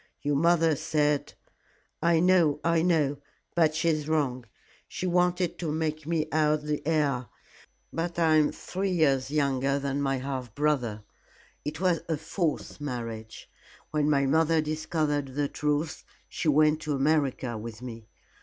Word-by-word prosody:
"Your 145 0 +1
mother 165 +1 +3
said 150 -1 0 0.3
" - - -34 0.3
"I 170 0 +3
know 175 -5 +4
I 165 -1 +3
know, 155 -5 +2 0.4
but 160 -3 +3
she 165 +1 +1
is 155 -1 -1
wrong. 130 -6 0 0.4
She - - -5
wanted 180 0 +1
to 165 -4 -2
make 155 -1 -2
me 160 -2 0
out 155 -1 +2
the 150 0 -2
heir. 140 -6 +1 0.7
But 170 +1 -3
I 160 -2 +4
am 150 -1 +3
three 195 +2 -3
years 140 -7 +2
younger 140 -2 +1
than 140 0 -2
my 135 -1 0
half 130 -4 -5
brother. 130 -8 0 0.6
It 150 +1 -5
was 180 -3 +2
a 160 - +1
false 160 -1 -3
marriage. 115 -5 -6 0.4
When 150 -1 +1
my 140 -2 +3
mother 160 +3 +3
discovered 155 -3 -1
the 145 0 +1
truth, 150 +2 -2 0.2
she - - -4
went 155 +1 +4
to 155 -1 -2
America 135 -4 +1
with 110 +1 -7
me. 115 -3 -8
150 Hz, 155 wpm, -28 LUFS, 140-160 Hz, 0.7 s, know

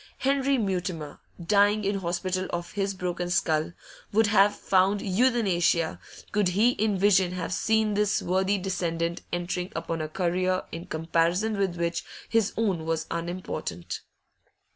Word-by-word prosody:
Henry 275 0 +2
Mutimer, 180 - -3 0.2
dying 205 +4 +3
in 200 0 0
hospital 185 +1 -2
of 175 0 -4
his 195 -1 -2
broken 180 -1 -3
skull, 160 -2 +1 0.4
would 220 +2 +4
have 205 0 +4
found 195 +2 +2
euthanasia, 190 -6 +2 0.3
could 205 -2 +2
he 210 +7 +3
in 215 -4 0
vision 190 -2 +3
have 180 0 -3
seen 220 +1 +2
this 210 0 +2
worthy 190 +3 +1
descendant 170 -3 -2
entering 180 +2 -2
upon 165 0 -3
a 155 - -3
career 185 +2 0
in 165 +2 -7
comparison 170 +6 +1
with 195 -3 0
which 170 0 -1 0.2
his 225 -2 +2
own 195 -7 0
was 160 -1 -1
unimportant. 170 - -4
185 Hz, 140 wpm, -27 LUFS, 170-205 Hz, 0.4 s, would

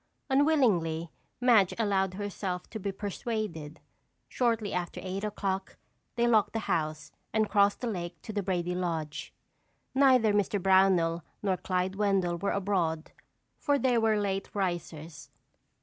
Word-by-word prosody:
Unwillingly, 210 - +2 0.3
Madge 230 -7 +4
allowed 195 -4 +1
herself 195 -3 -4
to 220 - -5
be 200 0 -2
persuaded. 195 -6 -4 0.5
Shortly 230 -4 0
after 180 -1 -3
eight 190 +2 -4
o'clock, 195 -2 -3 0.4
they 235 0 +2
locked 220 -3 +3
the 225 - -1
house 155 -1 -2 0.2
and 220 0 +2
crossed 200 -1 +3
the 245 - -2
lake 175 -5 -4
to 215 - -7
the 205 - 0
Brady 180 -2 -1
lodge. 165 -4 -3 0.6
Neither 260 -5 +5
Mr. 205 0 +1
Brownell 185 -3 +3 0.2
nor 195 -2 +2
Clyde 185 +1 -2
Wendell 190 -4 +1
were 200 - -1
abroad 180 -5 -1 0.5
for 285 -1 +2
they 260 -3 +2
were 220 -1 +2
late 195 -1 -2
risers. 170 -5 -4
195 Hz, 135 wpm, -29 LUFS, 175-215 Hz, 0.6 s, Neither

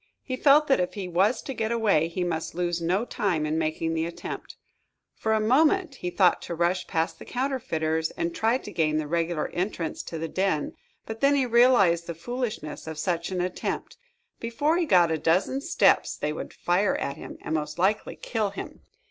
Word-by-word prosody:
He 255 - -3
felt 290 +3 +5
that 270 -7 +3
if 180 - -1
he 195 -3 -4
was 195 +7 +2
to 270 - -5
get 225 -2 -2
away 205 -9 +2
he 175 +2 -3
must 165 -2 -3
lose 175 -1 -1
no 185 +7 +1
time 195 -11 -1
in 155 +1 0
making 160 +1 -1
the 165 0 -1
attempt. 170 - -7 0.6
For 220 - -2
a 220 - +3
moment 305 - +3
he 180 - -3
thought 180 0 +3
to 170 - -5
rush 175 +2 0
past 165 -1 -1
the - - -9
counterfeiters 165 - -1
and 170 0 -1
try 225 +6 +2
to - - -10
gain 155 -2 +1
the 155 - -1
regular 165 0 -1
entrance 175 -3 -3
to 165 - -5
the 165 +1 -3
den, 185 -4 -1 0.3
but 220 0 -7
then 280 +1 +5
he 270 -2 +2
realized 235 -9 +4
the 170 - -4
foolishness 215 - -5
of 160 -1 -5
such 170 +1 -1
an 185 -2 -2
attempt. 180 0 -3 0.4
Before 285 +8 0
he 345 -2 0
got 175 - +5
a 160 - 0
dozen 185 - +1
steps, 340 +4 +3
they 150 - -2
would - - -6
fire 185 +3 +1
at 140 - -3
him, - - -9
and, - - -4
most 150 0 -2
likely, 195 +4 +1
kill 220 -4 -2
him. 200 - -8
180 Hz, 200 wpm, -26 LUFS, 165-230 Hz, 0.6 s, felt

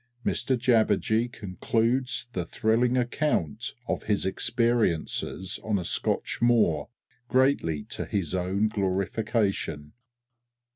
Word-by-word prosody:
XXV - - +3
_Mr 130 - 0
Jabberjee 115 -1 +2
concludes 115 +6 -1
the 90 - -1
thrilling 115 +7 +1
account 120 - -1
of - - -2
his 105 -2 +1
experiences 105 -3 0
on 110 -2 0
a 90 - -3
Scotch - - -1
moor, 110 -11 +3 0.4
greatly 125 - +2
to - - -5
his 95 -5 -2
own 95 +3 +1
glorification. 100 -5 -1
110 Hz, 105 wpm, -27 LUFS, 95-120 Hz, 0.4 s, XXV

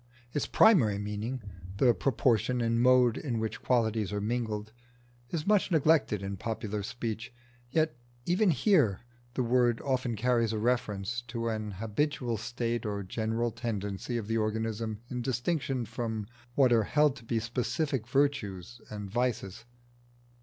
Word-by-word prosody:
Its 145 - -1
primary 135 - +5
meaning, 105 +4 -4 0.3
the 120 +2 +5
proportion 125 -1 +1
and 115 0 +1
mode 125 -2 +5
in 125 -6 -2
which 110 0 -3
qualities 110 -5 +1
are 105 - -1
mingled, 110 -1 -2 0.6
is 160 -3 -3
much 205 -2 +3
neglected 155 - +3
in 100 0 -4
popular 105 0 -3
speech, 115 +2 -4 0.4
yet 155 0 +1 0.3
even 185 +3 +3
here 145 - +3 0.3
the 130 - +1
word 120 -1 +3
often 130 -3 -1
carries 115 0 +1
a - - -1
reference 115 -1 -1
to 115 0 -3
an 110 -2 -3
habitual 120 +4 -1
state 120 +1 -2
or 100 -2 -3
general 115 +4 -1
tendency 110 -1 -3
of 115 - -3
the 115 0 +1
organism 110 0 -2
in 125 -1 -2
distinction 130 0 -1
from 110 -1 -3 0.3
what 130 -3 +5
are 110 -2 +4
held 150 +1 +3
to 120 - -12
be 115 0 0
specific 125 +2 -1
virtues 120 -6 -1
and 105 -1 -6
vices. 115 -3 -2
115 Hz, 145 wpm, -30 LUFS, 110-125 Hz, 0.6 s, primary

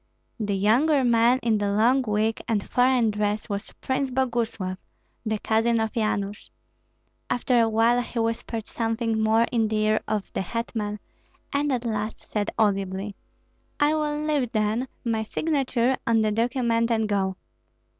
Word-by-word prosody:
The 205 -2 -1
younger 260 +9 +3
man 235 +1 +4
in 225 -2 +2
the 205 -1 0
long 240 +6 +4
wig 220 -1 0
and 215 -3 -1
foreign 245 -3 +3
dress 210 0 -1
was 200 +1 -4
Prince 265 +1 -1
Boguslav, 230 -7 -1 0.5
the 220 0 0
cousin 225 +2 +1
of 220 -1 -1
Yanush. 210 -2 -2 0.8
After 245 0 +2
a 225 - +3
while 230 +2 +3
he 245 - -7
whispered 230 -1 -2
something 225 -1 -1
more 220 +1 +4
in 225 -2 +2
the 215 - -2
ear 215 0 +2
of 210 -2 -3
the - - -1
hetman, 210 0 -3 0.6
and 285 +1 +1
at 250 -2 -1
last 215 -1 -2
said 210 -1 -3
audibly, 195 -1 0 0.6
"I 290 +1 +4
will 300 -1 -1
leave, 290 -6 0
then, 215 +4 0 0.2
my 225 -2 0
signature 265 0 0
on 225 -1 +3
the 215 - +1
document 230 0 +1
and 220 -2 +1
go." 195 -2 0
225 Hz, 155 wpm, -25 LUFS, 215-245 Hz, 0.8 s, man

